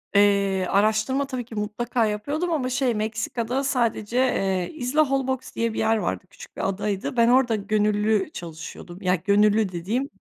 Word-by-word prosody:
Eee, 200 -2 +3
araştırma 220 +7 +2
tabii 255 -3 -4
ki 230 - -10
mutlaka 220 +3 -1
yapıyordum 285 +12 -2
ama 265 -6 0
şey 250 -1 +1
Meksika'da 220 +4 -2
sadece, 240 -4 0
eee, 195 -8 +1
Isla 290 +1 +1
Holbox 265 -1 -2
diye 230 -1 0
bir - - -3
yer 220 0 +2
vardı, 205 - -2
küçük - - -14
bir - - -1
adaydı. 200 +3 -3
Ben 230 0 +5
orada 245 -2 +4
gönüllü 210 0 +1
çalışıyordum, 170 +1 -9
ya 185 -1 +2
gönüllü 205 +2 +3
dediğim 215 +11 -2
220 Hz, 160 wpm, -24 LUFS, 200-255 Hz, -, Ben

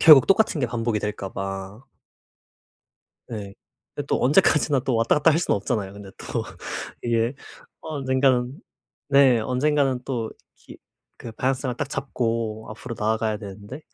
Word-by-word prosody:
결국 150 -5 +9
똑같은 195 -6 +3
게 125 - +2
반복이 115 -2 -1
될까 105 -2 -4
봐. 95 +4 -5 1.4
네. 100 -4 -6 0.4
근데 - - -4
또 - - +1
언제까지나 150 -1 +4
또 130 -4 0
왔다 115 0 +3
갔다 150 +2 +5
할 160 - +2
수는 175 - +1
없잖아요. 100 -2 -2
근데 100 -1 -10
또 - - -3 0.6
이게 115 +1 +1 0.5
언젠가는 130 -2 +1 0.5
네. 135 -4 +6
언젠가는 130 +2 +1
또 120 -5 -2 0.3
기 - - -14 0.4
그 115 - -8
방향성을 130 +1 -1
딱 145 - -2
잡고 115 -5 -2
앞으로 115 +2 -7
나아가야 110 0 0
되는데 105 +6 -9
120 Hz, 290 characters per minute, -24 LUFS, 110-135 Hz, 1.4 s, 결국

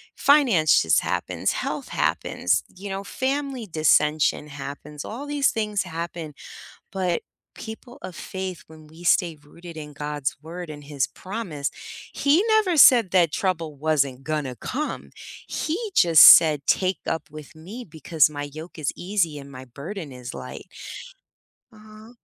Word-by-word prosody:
finances 195 - +4
happens, - - -1
health - - -4
happens, 90 - 0
you 195 +2 -8
know, 195 +1 -4
family 265 -1 -3
dissension 155 -2 +2
happens, 145 +1 -8
all 255 +7 -7
these 290 -2 +1
things 210 -2 -1
happen. 165 -2 -6 0.6
But 180 -3 -1 0.3
people 230 +2 -10
of 180 - -8
faith, 190 -2 -6
when 155 -1 -15
we 160 +3 -14
stay 170 -2 +2
rooted 170 +2 -12
in 150 -1 -8
God's 145 -1 -3
word 170 +1 -7
and 145 -1 -10
His 140 -3 -1
promise, 185 -8 -5 0.4
he 300 +8 +3
never 425 -7 +3
said 235 -8 +7
that 175 -5 +4
trouble 165 -6 -2
wasn't 140 -3 0
gonna 150 -5 -3
come, 300 - -5 0.4
he 320 +4 -2 0.2
just 165 -4 +7
said 155 -3 +9
take 185 -1 +1
up 165 - -2
with 155 0 -11
me 205 +10 -9
because 155 -1 +2
my 145 -1 -5
yoke 160 +2 -10
is 145 - -1
easy 175 -5 -1
and 140 0 -10
my 130 0 -10
burden 150 - -8
is 125 0 -8
light. - - -8 1.1
Uh-huh? 215 +1 -15
165 Hz, 145 wpm, -24 LUFS, 150-210 Hz, 1.1 s, said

